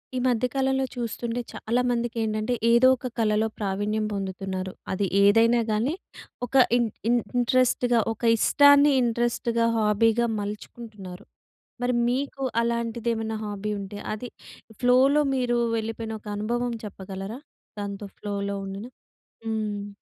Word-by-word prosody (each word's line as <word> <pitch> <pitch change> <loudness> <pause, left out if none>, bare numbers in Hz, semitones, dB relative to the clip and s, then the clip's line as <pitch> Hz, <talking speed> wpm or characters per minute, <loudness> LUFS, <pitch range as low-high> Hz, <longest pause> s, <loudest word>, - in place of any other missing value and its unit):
ఈ - - 0
మధ్య 245 -1 +2
కాలంలో 265 0 +1
చూస్తుంటే 235 0 -3
చాలామందికి 240 0 -1
ఏంటంటే. 215 +2 -1 0.2
ఏదో 235 +2 +6
ఒక 255 0 -6
కళలో 215 0 +2
ప్రావీణ్యం 205 +2 -1
పొందుతున్నారు. 190 -1 -4 0.2
అది 195 +1 0 0.2
ఏదైనా 225 +4 +5
గానీ. 225 +8 +1 0.5
ఒక 245 - -9 0.2
ఇన్ 240 -2 +1 0.2
ఇన్ 240 0 +4 0.2
ఇంట్రెస్ట్‌గా 245 -1 +2
ఒక 220 - -21 0.2
ఇష్టాన్ని 285 +4 +6
ఇంట్రెస్ట్‌గా 235 -1 0
హాబీగా 225 +2 +3
మలుచుకుంటున్నారు. 205 -2 -8 0.6
మరి 245 0 +1
మీకు 270 +2 -2 0.2
అలాంటిది 235 0 -1
ఏమన్నా 220 -1 -3
హాబీ 205 0 -4
ఉంటే. 200 +1 -7
అది 215 +3 -5 0.5
ఫ్లోలో 260 +4 +5
మీరు 245 -2 +1 0.2
వెళ్ళిపోయిన 225 0 -4
ఒక - - -27
అనుభవం 240 +3 -1
చెప్పగలరా? 195 +2 -7 0.4
దాంతో 200 0 -5
ఫ్లోలో 200 -1 -3
ఉండిన? 195 +3 -6 0.6
హ్మ్. 210 -2 -2
225 Hz, 120 wpm, -25 LUFS, 205-245 Hz, 0.6 s, ఏదో